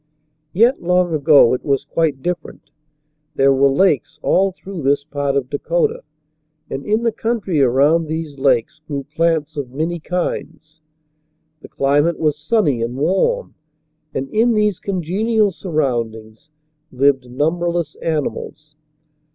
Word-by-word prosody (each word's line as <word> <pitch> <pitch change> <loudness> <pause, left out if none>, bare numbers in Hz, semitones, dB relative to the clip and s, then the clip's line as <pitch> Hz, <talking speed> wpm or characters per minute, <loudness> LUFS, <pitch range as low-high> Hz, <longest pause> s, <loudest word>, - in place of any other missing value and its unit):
Yet, 230 +9 +3
long 180 0 +1
ago, 145 -4 +5
it 125 - -2
was 140 -2 0
quite 150 -3 -1
different. 175 -2 -5 0.6
There 135 0 +4
were 135 +1 +4
lakes 140 - +1
all 195 +1 +2
through 185 -1 -8
this 140 +1 +1
part 145 -2 -2
of 135 -3 0
Dakota, 465 - -1 0.7
and 135 - -4
in 215 +2 +1
the 230 - +2
country 210 -10 -1
around 145 +6 +3
these 155 -3 -5
lakes 135 +2 +1
grew 140 -2 -4
plants 155 +1 -1
of 140 -4 -4
many 160 +6 -3
kinds. 160 -2 -5 0.8
The - - -12
climate 145 +4 +1
was 150 -2 +1
sunny 150 - 0
and 120 +2 -3
warm, 335 - 0 0.6
and 135 - -3
in 230 +2 +2
these 210 -3 +1
congenial 200 +4 0
surroundings 120 - -3 0.4
lived 130 -1 +1
numberless 165 +4 -1
animals. 150 -1 -4
155 Hz, 130 wpm, -19 LUFS, 140-180 Hz, 0.8 s, ago